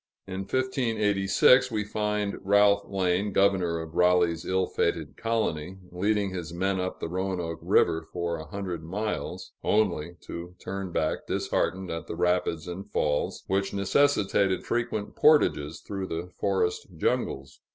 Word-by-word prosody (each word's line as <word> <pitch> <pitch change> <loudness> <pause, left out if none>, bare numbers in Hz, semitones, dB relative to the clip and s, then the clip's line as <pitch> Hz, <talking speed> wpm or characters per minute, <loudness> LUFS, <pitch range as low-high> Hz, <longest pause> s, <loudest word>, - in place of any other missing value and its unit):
In 95 0 -5
1586, 115 -2 +3
we 110 -3 -1
find 105 -1 -2
Ralph 100 0 +4
Lane, 95 +1 0
governor 95 -4 +2
of 80 0 -7
Raleigh's 90 -1 +3
ill 95 0 +1
fated 80 -6 -1
colony, 95 -7 -2
leading 100 +2 0
his 85 -3 -5
men 95 +2 0
up 90 0 -3
the - - -3
Roanoke 90 -2 -3
River 80 0 +2
for 85 -1 -2
a 80 0 -8
hundred 90 -2 -5
miles, 105 +6 -4
only 85 -6 +1
to 85 +1 -8
turn 95 -1 -5
back 80 -2 -1
disheartened 95 +1 -1
at 80 0 -5
the - - -5
rapids 90 -2 0
and 95 +3 -6
falls, 75 -6 -1
which 95 +1 -1
necessitated 100 -3 +2
frequent 110 -3 -2
portages 80 - +3
through 95 -2 -5
the 85 +2 -5
forest 95 -3 0
jungles. 65 0 -1
95 Hz, 140 wpm, -27 LUFS, 85-100 Hz, -, Ralph